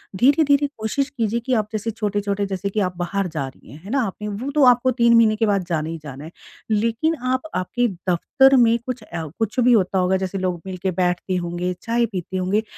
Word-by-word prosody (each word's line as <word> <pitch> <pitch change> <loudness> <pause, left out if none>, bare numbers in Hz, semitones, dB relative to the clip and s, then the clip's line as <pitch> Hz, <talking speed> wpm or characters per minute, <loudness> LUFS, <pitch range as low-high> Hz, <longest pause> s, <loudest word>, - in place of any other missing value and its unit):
धीरे-धीरे 285 - +4
कोशिश 245 +6 -1
कीजिए 230 -3 -1
कि 255 +2 -2
आप 215 -3 +1
जैसे 215 +2 -2
छोटे-छोटे 205 -2 -2
जैसे 195 0 -3
कि 215 - -2
आप 180 -3 -1
बाहर 190 +2 -1
जा 155 -5 -4
रही 130 - -15
हैं, 145 - -11
है 200 - -10
ना? 275 0 +2
आपने 210 -1 -4
वो 215 +7 -4
तो 295 - +4
आपको 250 +1 +5
3 235 -1 +3
महीने 220 -2 +5
के 225 +1 +1
बाद 200 -3 +1
जाना 160 -2 -1
ही 165 - -4
जाना 140 0 -8
है। 160 - -10 0.4
लेकिन 230 +9 +1 0.2
आप 260 - 0
आपके 240 +7 0 0.2
दफ्तर 270 - +4
में 235 -1 +5
कुछ 255 -3 -5
अ, 165 -5 -6
कुछ 225 +3 -1
भी 245 0 +5
होता 190 -3 +2
होगा 185 +1 +2
जैसे 190 +1 -5
लोग 180 -2 -2
मिलके 185 0 -3
बैठते 180 +1 0
होंगे, 175 +1 -2
चाय 235 +1 +1
पीते 190 -3 -5
होंगे। 190 +4 0
205 Hz, 220 wpm, -22 LUFS, 185-235 Hz, 0.4 s, आपको